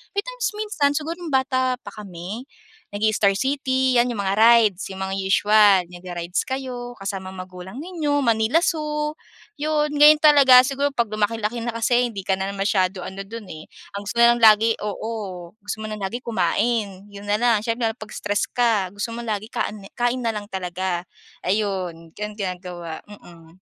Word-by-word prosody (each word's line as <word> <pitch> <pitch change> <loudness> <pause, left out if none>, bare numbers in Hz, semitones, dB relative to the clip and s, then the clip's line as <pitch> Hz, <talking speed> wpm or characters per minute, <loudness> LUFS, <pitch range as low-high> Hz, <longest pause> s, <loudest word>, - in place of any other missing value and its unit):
May 405 - 0
times - - -3
minsan, 415 -10 0
siguro 320 +4 -3
nung 350 - -7
bata 260 -1 +1
pa 205 - -8
kami, 200 +4 -8 0.5
nag-i-Star 210 -1 +2
City, 260 0 +1
'yan, 240 - +3
yung 210 -4 -3
mga 195 0 0
rides, 220 -4 +5
yung 190 0 -5
mga 190 0 -3
usual, 205 +1 +5
nagra-rides 175 0 -4
kayo 250 -2 -5
kasama 195 -2 -5
magulang 185 +1 -9
ninyo, 305 -5 -1
Manila 230 +7 +2
Zoo, 300 -4 -1 0.5
'yon. 300 0 0
Ngayon 295 +1 +7
talaga 275 -4 +8
siguro, 280 +1 -1
'pag 235 -3 0
lumaki-laki 215 +2 -1
na 230 0 -4
kasi 240 +2 +2
hindi 200 -5 -7
ka 190 0 0
na 195 +1 -3
masyado 190 -2 0
ano 190 +2 -7
don 225 -1 -8
eh. 155 0 -10 0.3
Ang 200 - -4
gusto - - -4
mo 235 - +3
na - - +6
lang - - -5
lagi 220 +1 +5
oo, 210 +2 -4 0.5
gusto 205 +1 -5
mo 215 - -4
na 215 - -5
lagi 195 +5 -3
kumain, 205 -1 -1
'yon 200 0 -10
na 205 - +2
lang. 235 -2 +3
Siyempre 230 0 0
lalo - - -15
'pag 215 -1 -9
stress 205 0 -1
ka, 225 -7 +1
gusto 205 +3 -3
mo - - -5
lagi 215 -2 -3
kaan 210 -1 -3
kain 245 +1 0
na 230 - +1
lang 205 -1 -5
talaga. 185 -2 -3 0.4
Ayon, 185 -5 -2
ganon 210 +1 -6
ginagawa, 180 -4 -5
mm. 170 -4 -15
215 Hz, 180 wpm, -22 LUFS, 195-255 Hz, 0.5 s, talaga